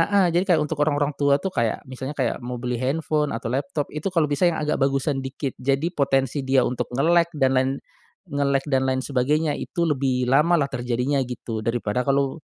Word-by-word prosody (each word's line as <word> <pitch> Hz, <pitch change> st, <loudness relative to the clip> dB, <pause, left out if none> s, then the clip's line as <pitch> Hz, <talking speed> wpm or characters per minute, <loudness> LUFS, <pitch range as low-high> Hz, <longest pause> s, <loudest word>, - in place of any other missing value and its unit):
heeh, 190 Hz, 0 st, +3 dB
jadi 175 Hz, +2 st, +3 dB
kayak 155 Hz, -, +1 dB
untuk 150 Hz, 0 st, -4 dB
orang-orang 145 Hz, -1 st, +1 dB
tua 140 Hz, -1 st, +4 dB
tuh 190 Hz, -, -1 dB
kayak 115 Hz, -7 st, -1 dB
misalnya 130 Hz, +2 st, -6 dB
kayak 130 Hz, -4 st, 0 dB
mau 125 Hz, 0 st, -4 dB
beli 125 Hz, -1 st, -2 dB
handphone 150 Hz, +1 st, 0 dB
atau 115 Hz, 0 st, -5 dB
laptop, 140 Hz, +2 st, -2 dB
itu 150 Hz, +3 st, -5 dB
kalau 165 Hz, -, +3 dB
bisa 145 Hz, +5 st, +2 dB
yang 170 Hz, -, -1 dB
agak 150 Hz, 0 st, 0 dB
bagusan 135 Hz, +1 st, +1 dB
dikit. 135 Hz, 0 st, -4 dB
Jadi 140 Hz, +6 st, 0 dB
potensi 135 Hz, -2 st, +1 dB
dia 130 Hz, -1 st, +4 dB
untuk 125 Hz, -, -2 dB
nge-lag 170 Hz, +4 st, +4 dB
dan 135 Hz, -2 st, +3 dB
lain 130 Hz, +1 st, +1 dB, 0.6 s
nge-lag 140 Hz, -1 st, +1 dB
dan 130 Hz, -1 st, +2 dB
lain 130 Hz, 0 st, +1 dB
sebagainya, 145 Hz, +4 st, 0 dB
itu 170 Hz, -, -3 dB
lebih 130 Hz, -3 st, 0 dB
lamalah 150 Hz, +2 st, +4 dB
terjadinya 125 Hz, +2 st, -1 dB
gitu, 115 Hz, -2 st, -5 dB
daripada 115 Hz, 0 st, 0 dB
kalau 140 Hz, +1 st, +1 dB
140 Hz, 190 wpm, -23 LUFS, 130-150 Hz, 0.6 s, tua